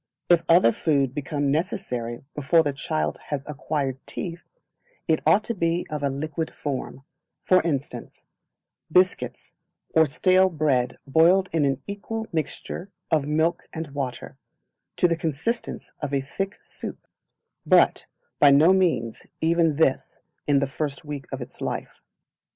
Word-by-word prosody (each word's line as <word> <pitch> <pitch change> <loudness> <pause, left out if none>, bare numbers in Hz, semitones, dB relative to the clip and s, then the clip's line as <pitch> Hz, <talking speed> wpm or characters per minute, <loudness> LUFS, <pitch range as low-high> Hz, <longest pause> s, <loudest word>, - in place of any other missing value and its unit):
If 170 -1 +6
other 165 -8 +6
food 140 -4 +1
become 145 -1 -1
necessary 125 - -2
before 150 +3 +3
the 145 -2 -1
child 75 - -2
has 145 -2 -3
acquired 145 -3 -3
teeth, 170 -2 -6 0.6
it 160 -2 +3
ought 195 +7 +5
to 235 - -1
be 170 -3 0
of 150 -1 -3
a 140 - +1
liquid 155 +3 -3
form; 135 -1 -5 0.4
for 185 0 +5
instance, 145 -4 -4 0.7
biscuits 180 +2 +1 0.4
or 160 -1 +5
stale 185 +6 +4
bread 140 -7 0
boiled 175 +6 +4
in 160 -3 +2
an 135 -1 -1
equal 220 +2 -5
mixture 165 +4 -4 0.2
of 150 -3 +2
milk 160 +3 0
and 160 -2 -5
water, 135 -3 -5 0.6
to 180 - +4
the 170 - +1
consistence 165 - -3
of 145 -2 -2
a 135 - +1
thick 195 +9 -4
soup; - - -8 0.6
but - - +4 0.3
by 145 - +7
no 150 +6 +6
means 165 -12 0
even 165 -1 +2
this 140 -3 0 0.2
in 145 -1 +4
the 140 0 +1
first 140 +1 -4
week 145 -2 -6
of - - -4
its - - -10
life. - - -4
155 Hz, 145 wpm, -25 LUFS, 140-170 Hz, 0.7 s, by